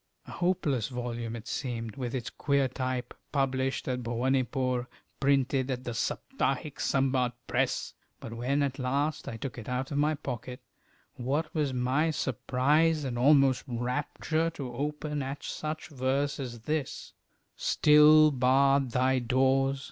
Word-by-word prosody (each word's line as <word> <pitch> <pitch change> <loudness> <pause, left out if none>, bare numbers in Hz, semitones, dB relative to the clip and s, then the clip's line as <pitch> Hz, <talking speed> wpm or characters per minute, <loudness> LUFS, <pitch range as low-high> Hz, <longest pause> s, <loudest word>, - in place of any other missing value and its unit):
A - - -10
hopeless 150 - 0
volume 120 -2 -4
it 115 +2 -9
seemed, 115 -5 -4
with 125 -2 -4
its 120 -3 -4
queer 140 -2 +1
type, 130 -1 -3 0.2
published 135 -1 0
at 125 -1 -1
Bhowanipore, 125 +1 0 0.3
printed 135 -1 +2
at 125 -1 -2
the 120 - -4
Saptahiksambad 135 - 0
Press! - - -1 0.3
But 115 - -8
when 130 +5 0
at 140 0 -2
last 140 +4 -1
I 115 - -5
took 125 +1 -6
it 110 - -8
out 130 +2 -2
of 145 - 0
my 150 +1 +2
pocket, 125 -3 -6 0.6
what 135 +6 -1
was 150 -4 0
my 130 +5 +1
surprise 150 +3 +1
and 130 -3 -3
almost 135 +1 +4
rapture 145 +6 -1
to 140 -7 -7
open 150 +2 -3
at 135 +1 -5
such 155 0 -5
verse 140 +1 -1
as 120 -4 -6
this: 150 +2 -3 0.4
Still 150 +1 +6
barred 135 +1 +3
thy 130 +2 +2
doors! 135 +2 +2
130 Hz, 140 wpm, -29 LUFS, 125-145 Hz, 0.6 s, Still